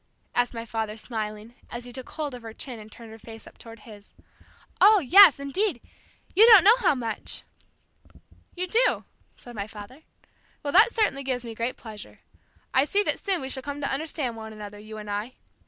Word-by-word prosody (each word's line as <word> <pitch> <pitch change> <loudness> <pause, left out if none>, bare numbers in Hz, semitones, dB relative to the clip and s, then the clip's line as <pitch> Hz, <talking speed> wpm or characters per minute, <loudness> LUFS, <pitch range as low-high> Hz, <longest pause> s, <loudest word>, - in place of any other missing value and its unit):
asked 245 0 +1
my 230 0 -5
father 220 -1 -4
smiling, 215 0 -6 0.2
as 240 0 -7
he 245 - -11
took 260 0 -9
hold 300 -4 -5
of 250 - -8
her 225 -1 -10
chin 250 -5 -7
and 215 0 -13
turned 230 0 -13
her 225 - -12
face 225 0 -12
up - - -16
toward 230 -1 -12
his. 210 -3 -15 0.7
"Oh, 425 +1 +8
yes, 360 -1 +7
indeed; 285 - -1 0.6
you 435 +5 +8
don't 430 -6 +9
know 425 +4 +7
how 390 - +2
much!" 230 -4 -4 1.1
"You 365 +1 -2
do?" 460 +6 +2 0.3
said 240 - -13
my 200 -2 -5
father. 220 +6 -12 0.6
"Well, 285 - -3
that 420 +6 +6
certainly 420 -13 0
gives 255 -2 -3
me 230 - -6
great 230 +3 -3
pleasure. 215 -3 -11 0.5
I 260 - +5
see 405 +8 +1
that - - -1
soon 385 -5 -1
we 265 - -5
shall 265 - -2
come 285 +2 -6
to 280 - -2
understand 280 -4 -3
one 220 -1 -9
another, 205 -1 -9
you 215 +1 -10
and 210 -1 -9
I. 210 +5 -4
245 Hz, 200 wpm, -25 LUFS, 220-300 Hz, 1.1 s, don't